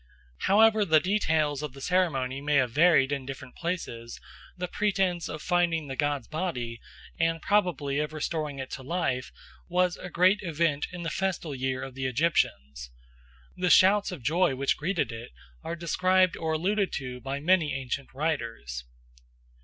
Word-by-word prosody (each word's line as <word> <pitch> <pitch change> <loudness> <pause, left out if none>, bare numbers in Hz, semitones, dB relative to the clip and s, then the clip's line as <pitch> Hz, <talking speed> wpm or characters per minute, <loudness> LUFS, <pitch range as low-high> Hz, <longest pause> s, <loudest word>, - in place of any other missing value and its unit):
However 215 +1 +5
the 160 -5 +5
details 155 -6 +1
of 150 -4 -5
the 135 - -11
ceremony 135 -6 0
may 145 +1 0
have 130 -4 +3
varied 145 -1 +4
in 140 -2 -2
different 135 -2 -8
places, 165 -10 -4 0.4
the 180 0 -3
pretence 190 -3 0
of 155 - -6
finding 175 -3 +1
the 135 -2 -5
god's 145 -4 -1
body, 125 -9 -4 0.4
and 165 0 +1
probably 160 -9 +1
of 150 0 -2
restoring 155 -2 -3
it 130 -1 -6
to - - -6
life, 130 -4 -2 0.4
was 180 0 +1
a 180 - -8
great 185 +4 +4
event 165 -4 0
in 180 -1 -6
the 165 - -3
festal 185 -5 -2
year 130 0 -2
of 135 - -7
the 130 0 -2
Egyptians. 70 - 0 0.7
The 180 0 0
shouts 200 +3 +5
of 165 -9 -8
joy 155 +1 +2
which 135 +1 +1
greeted 170 -2 -1
it 115 - -9 0.3
are 170 - -4
described 185 +2 +2
or 160 -1 -2
alluded 195 +5 0
to 125 -2 -4
by 135 +2 -3
many 160 0 +3
ancient 135 0 -4
writers. 115 - -3
155 Hz, 160 wpm, -28 LUFS, 135-180 Hz, 0.7 s, However